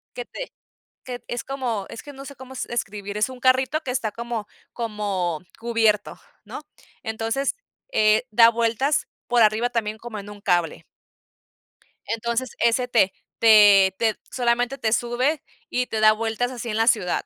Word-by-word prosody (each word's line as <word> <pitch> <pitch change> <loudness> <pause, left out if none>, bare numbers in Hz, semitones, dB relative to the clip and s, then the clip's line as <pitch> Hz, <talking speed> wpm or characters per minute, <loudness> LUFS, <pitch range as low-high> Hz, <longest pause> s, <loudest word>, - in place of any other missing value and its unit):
Que 245 - -5
te - - -8 0.5
que 250 -1 -5
t - - -39
es 240 - -4
como, 245 -7 -3
es 230 - -9
que 290 - -10
no 275 0 -10
sé 280 - -9
cómo 260 0 -11
s - - -4
describir, 205 -3 -4
es 210 +4 +1
un 255 -1 -10
carrito 260 +4 +2
que 270 - -7
está 230 -4 -1
como 235 -1 -5 0.3
como 205 -8 -2 0.2
cubierto, 225 -3 +1 0.3
¿no? - - -7 0.4
Entonces, 225 +5 -2 0.4
eh, 215 - +4
da 230 +1 +7
vueltas 235 +5 0 0.2
por 240 -1 +3
arriba 220 +2 +3
también 220 -2 -2
como 220 -1 -7
en 200 +1 -9
un 205 0 -11
cable. 175 -4 0 1.2
Entonces, 235 +2 -2
ese 235 +2 +2
te 225 -6 +3 0.3
te 205 -4 +7
te 225 -2 +2 0.2
solamente 245 +1 0
te 220 -5 -1
sube 250 +6 0 0.3
y 250 0 0
te 220 - -2
da 215 0 +7
vueltas 225 +3 -2
así 240 -2 -6
en 215 - -2
la 225 0 +2
ciudad. 210 -7 +2
230 Hz, 170 wpm, -23 LUFS, 215-250 Hz, 1.2 s, da